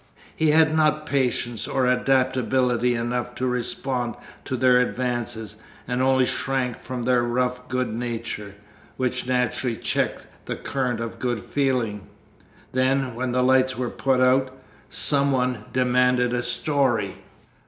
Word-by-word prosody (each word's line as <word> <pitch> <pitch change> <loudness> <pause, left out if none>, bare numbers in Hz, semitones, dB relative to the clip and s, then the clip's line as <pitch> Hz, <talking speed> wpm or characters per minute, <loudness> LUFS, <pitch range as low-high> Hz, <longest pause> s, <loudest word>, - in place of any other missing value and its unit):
He 160 - +2
had 155 0 +4
not 155 -1 +2
patience 125 -4 -1
or 130 -1 0
adaptability 125 -1 +2
enough 120 +1 -2
to 130 - -2
respond 125 -1 -2 0.3
to 130 - -2
their 125 0 +5
advances, 120 -4 -3 0.3
and 125 +1 -1
only 130 0 +3
shrank 130 -2 -1
from 125 -1 -6
their 125 0 +3
rough 125 +1 -1
good 125 -3 -1
nature 115 -3 -5 0.4
which 125 -1 -1
naturally 125 -1 0
checked - - -1 0.2
the - - -3
current 125 -4 -2
of 115 -1 -6
good 120 -3 -1
feeling. 125 -8 -1 0.6
Then, 130 0 +1
when 125 +2 -2
the 125 +1 +1
lights 130 0 +3
were 125 -1 -2
put 130 -1 +1
out, 130 +1 +3 0.4
some 140 -1 +4
one 125 -4 0
demanded 125 -1 +2
a 125 - 0
story. 120 -5 0
125 Hz, 135 wpm, -24 LUFS, 120-130 Hz, 0.6 s, their